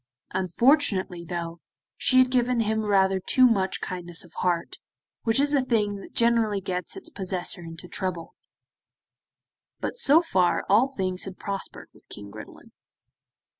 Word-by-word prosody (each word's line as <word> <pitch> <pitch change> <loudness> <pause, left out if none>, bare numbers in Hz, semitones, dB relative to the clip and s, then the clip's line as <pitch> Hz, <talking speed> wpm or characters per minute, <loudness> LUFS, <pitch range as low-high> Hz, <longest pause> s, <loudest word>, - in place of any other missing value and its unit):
Unfortunately, 190 - +1
though, 170 -1 -5 0.4
she 255 - +2
had 255 0 +5
given 245 -1 +2
him 220 0 -1
rather 195 -2 +3
too 255 +7 +4
much 195 -6 +1
kindness 175 -2 -3
of 170 - -19
heart, 175 -2 -1 0.5
which 225 +3 +2
is 285 +1 +2
a 280 - +4
thing 210 -5 0
that 195 - -12
generally 230 -3 +2
gets 180 - -5
its 345 -3 -7
possessor 185 - -2
into 165 +1 -10
trouble, 180 -3 -4 1.5
but - - -3
so 310 - +5
far 185 - +1
all 220 +6 +4
things 185 -8 -2
had 190 -1 -8
prospered 200 -1 -6
with - - -23
King 100 0 -9
Gridelin. - - -12
195 Hz, 145 wpm, -25 LUFS, 180-240 Hz, 1.5 s, had